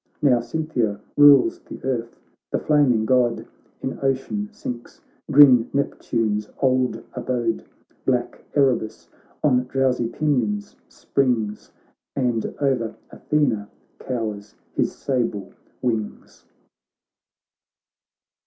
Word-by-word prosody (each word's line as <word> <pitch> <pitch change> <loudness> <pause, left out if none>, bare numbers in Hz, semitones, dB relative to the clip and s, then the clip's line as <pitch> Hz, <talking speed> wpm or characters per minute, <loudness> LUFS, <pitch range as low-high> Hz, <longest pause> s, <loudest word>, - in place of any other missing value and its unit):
Now 135 -5 +4
Cynthia 120 -5 -2 0.2
rules 145 -2 +6
the - - -10
earth, 120 -3 -3 0.3
the - - +1
flaming 135 -7 +3
God 125 -1 +2 0.4
In 130 - -3
ocean 135 +10 -1
sinks, 125 - -7 0.3
green 135 -5 +7
Neptune's 110 -6 -1
old 130 -1 +1
abode; 120 - -2 0.4
Black 125 -2 -1
Erebus 130 -6 +1 0.3
on 125 -4 +3
drowsy 130 -2 +1
pinions 115 -7 -1
springs, 120 -6 -1 0.4
And 120 -4 0
o'er 130 -6 0 0.2
Athena 115 -9 0 0.3
cowers 110 -5 -4 0.2
his - - 0
sable 115 -7 -2 0.3
wings. 110 -4 -3
125 Hz, 90 wpm, -23 LUFS, 115-135 Hz, 0.4 s, green